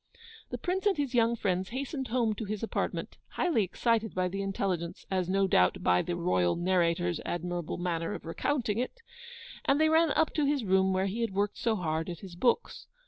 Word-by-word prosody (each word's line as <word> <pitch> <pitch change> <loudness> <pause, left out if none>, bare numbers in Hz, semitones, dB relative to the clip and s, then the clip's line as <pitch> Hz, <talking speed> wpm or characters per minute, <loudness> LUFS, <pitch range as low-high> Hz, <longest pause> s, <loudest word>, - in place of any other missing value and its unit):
The - - -4
Prince 380 +3 -1
and 395 - +2
his 280 -3 -1
young 235 -1 +3
friends 190 -4 -1
hastened 265 +1 -4
home 230 -2 +1
to 215 +1 -5
his 210 +1 -4
apartment, 225 - -3 0.2
highly 330 -11 +2
excited 225 +4 0
by 185 0 +1
the 195 +2 -3
intelligence, 185 -3 -2
as 185 -2 0
no 195 +1 +3
doubt 90 - +3
by 90 0 +4
the 175 - -3
ROYAL 95 - +1
NARRATOR'S 175 -1 +1
admirable 175 -1 -3
manner 170 -2 -2
of - - -9
recounting 220 - -1
it, 465 - -4 0.6
and 275 +2 +3
they 315 0 +4
ran 320 +1 +4
up 320 - +2
to 300 -2 +1
his 280 -3 +1
room 190 -1 +3
where 190 0 +1
he 205 +4 -2
had 225 -5 -2
worked 205 +1 0
so 225 -2 +1
hard 160 -3 -2
at 170 -2 -6
his 185 -3 -9
books. 240 - 0
195 Hz, 200 wpm, -30 LUFS, 175-240 Hz, 0.6 s, by